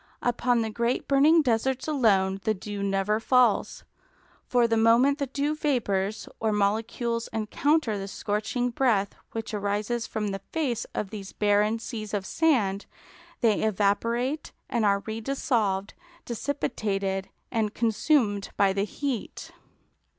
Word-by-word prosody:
Upon 245 -1 +2
the 220 - -3
great 235 +3 -1
burning 300 +4 +5
deserts 255 +2 0
alone 195 -10 +2
the 220 -1 +1
dew 205 +1 -6
never 200 +2 +1
falls; 245 -2 +2 0.6
for 245 -2 +3
the 230 - +1
moment 235 +6 +4
the 280 - -1
dew 285 +3 -1
vapours 220 -9 -1
or 220 0 +1
molecules 225 +3 -1
encounter 225 +2 +1
the 195 - -5
scorching 215 +5 -2
breath 225 -6 +1 0.2
which 225 -1 -5
arises 210 +3 -1
from 210 -2 -2
the 195 -1 -4
face 260 -8 -1
of 200 - -3
these 205 -3 -7
barren 210 +1 +2
seas 215 -2 -5
of 195 -2 -2
sand, 215 - +1 0.5
they 220 -3 +3
evaporate 230 +7 0 0.2
and 235 -4 +1
are 200 -1 +3
redissolved, 220 -3 -1 0.3
dissipated 205 -7 -2 0.2
and 220 -3 -1
consumed 225 -2 +1
by 195 -1 +4
the 200 +1 0
heat. 265 +1 -4
220 Hz, 130 wpm, -27 LUFS, 205-245 Hz, 0.6 s, burning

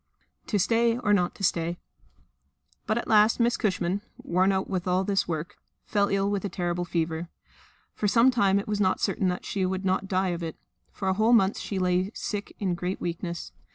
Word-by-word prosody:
To 210 - +1
Stay 230 +4 +2
or 210 -4 +1
not 180 -3 +1
to 195 - -9
Stay? 170 -1 0 1.1
But 215 - +1
at 235 - -3
last 215 +2 +4
Miss 235 0 +3
Cushman 190 -3 -1 0.2
worn 185 +3 +1
out 190 0 -1
with 185 -2 -3
all 180 +1 +2
this 195 0 0
work 165 +2 -4 0.3
fell 205 -2 +1
ill 195 0 +1
with 200 -2 -1
a 200 - -2
terrible 175 -1 -2
fever. 165 0 -2 0.6
For 210 - -1
some 230 +5 +5
time 200 -5 +3
it 200 - -2
was 210 -1 -1
not 185 -1 +2
certain 190 - 0
that 180 0 -2
she 195 - -2
would 190 +1 -1
not 190 +1 0
die 190 0 +1
of 175 -1 -3
it; 165 -2 -4 0.4
for 190 - -5
a 190 - +3
whole 220 +4 +3
month 200 -3 +4
she 200 - -4
lay 185 +1 +1
sick 205 -1 -4
in 190 -3 -1
great 180 +2 -3
weakness. 170 0 -4
190 Hz, 205 wpm, -27 LUFS, 180-205 Hz, 1.1 s, some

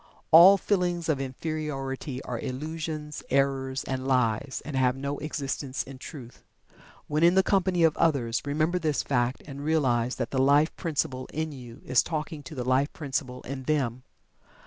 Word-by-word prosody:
All 180 +5 +10
feelings 175 -4 0
of 140 -3 +1
Inferiority 135 -1 -4
are 120 -2 -4
illusions, 150 +3 -5
errors, 135 -1 +1
and 130 0 -3
lies, 130 0 +1
and 150 - -5
have 130 -1 +2
no 140 +1 -4
existence 140 -3 -3
in 135 -1 -11
Truth. 130 -4 -10 0.6
When 150 +1 -1
in 170 +2 +5
the 190 - +5
company 185 -3 +2
of 160 -1 +4
others 125 -8 +1
remember 155 +5 0
this 155 -4 0
fact 125 -1 0
and 140 -1 -8
realize 130 -6 +1
that 120 -3 -3
the 130 - +1
Life 145 +4 +4
Principle 135 -6 -2
in 155 +1 -2
you 125 -4 -11
is 130 - +4
talking 155 -1 -4
to 145 +3 -10
the 125 -2 -3
Life 130 +3 +2
Principle 135 -4 -4
in 135 0 -5
them. 130 -5 0
140 Hz, 165 wpm, -27 LUFS, 130-155 Hz, 0.6 s, All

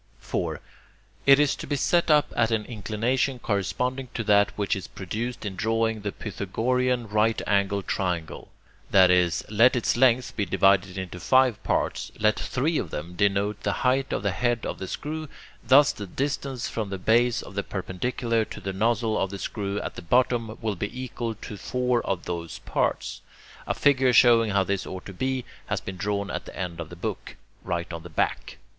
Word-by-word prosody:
4. - - -3 0.7
It 140 0 +8
is 150 -1 +3
to - - -8
be 145 - 0
set 170 +5 +2
up 150 -1 +4
at 115 - +3
an 110 -2 0
inclination 120 +4 -1
corresponding 125 +5 -1
to 115 - -1
that 100 -1 +4
which 100 -2 0
is 95 - -6
produced 110 +6 -5
in 100 -2 -4
drawing 110 +1 0
the 100 0 -3
Pythagorean 120 +5 -1
right 110 +2 +2
angled 100 -1 +1
triangle: 85 -5 -2 0.4
that 95 -2 +6
is, 90 -2 +2
let 115 +5 +5
its 120 - +1
length 125 0 +3
be 105 - 0
divided 95 0 +3
into 90 -1 -5
five 120 +5 +3
parts; - - -1
let 110 +1 +2
three 150 +6 0
of 85 - -4
them 80 +4 -6
denote 100 +2 +1
the 100 - 0
height 130 +1 +2
of - - -1
the 100 - +1
head 120 +5 0
of - - -4
the 95 - -5
screw; 155 +6 -4 0.4
thus 140 +2 +6
the 100 - -7
distance 135 +2 -2
from 110 -3 -3
the 95 - -3
base 115 +5 +2
of - - -11
the 100 - -1
perpendicular 115 +5 -2
to - - -8
the 95 - -4
nozzle 110 +2 +1
of 95 - 0
the 100 - -6
screw 100 0 -3
at - - -5
the - - -8
bottom 115 +3 +1
will 110 -2 0
be 100 +7 -5
equal 120 -3 -4
to 105 -1 -8
four 125 +3 0
of 95 -2 -2
those 85 -2 -4
parts. - - -1 0.5
A - - 0
figure 130 -3 +3
showing 115 -2 +6
how 100 -1 +2
this 100 0 -2
ought 95 0 -7
to 95 - -8
be, 130 +5 -2 0.2
has - - -1
been 95 -1 -7
drawn 100 +1 -2
at - - -4
the - - -10
end 90 -3 -4
of 80 -2 -5
the 85 - -9
book, 85 - -5 0.3
right 85 -2 -3
on 85 - -5
the 85 - -10
back. 80 - -2
110 Hz, 195 wpm, -26 LUFS, 95-125 Hz, 0.7 s, It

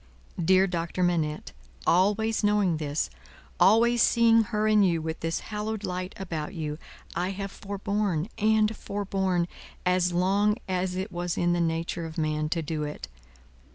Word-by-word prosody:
"Dear 190 +3 +5
Doctor 175 0 -2
Manette, 160 -4 0 0.3
always 210 +5 +2
knowing 205 -5 +2
this, 150 - -2 0.5
always 235 +4 +5
seeing 230 -2 +5
her 215 -1 0
and 215 -1 +5
you 170 -3 +2
with 160 0 -4
this 165 0 -2
hallowed 215 0 -4
light 180 -1 -4
about 165 -5 -5
you, 155 -2 -4 0.4
I 180 +2 0
have 195 0 -5
forborne, 200 -4 -2
and 215 0 +3
forborne, 190 -4 -1 0.4
as 180 0 +2
long 200 +4 +2
as 185 -1 -1
it 190 +3 -3
was 175 0 -3
in 175 0 +2
the 175 - +1
nature 165 0 -1
of 160 - -10
man 155 -1 0
to 165 0 -1
do 155 0 -3
it. 150 - -5
185 Hz, 155 wpm, -27 LUFS, 165-205 Hz, 0.5 s, Dear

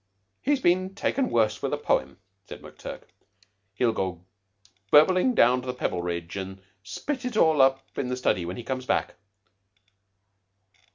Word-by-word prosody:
He's 285 0 +1
been 185 -2 +1
taken 260 +5 0
worse 110 -2 +1
with - - -2
a - - +1
poem," 65 +1 -1 0.3
said - - -10
McTurk. - - -9 0.7
"He'll 120 +2 +2
go 90 -4 -4 0.6
burbling 185 - +5
down 125 - +4
to 130 - -10
the 125 - -3
Pebbleridge 85 -6 -3
and 95 0 -6 0.2
spit 265 - -5
it 250 -3 -3
all 160 -6 +4
up 135 0 +3
in 130 - -2
the 125 0 -2
study 90 -8 +1
when 90 +2 -5
he 120 - -6
comes 130 0 -4
back." 145 - 0
125 Hz, 155 wpm, -26 LUFS, -, 0.7 s, burbling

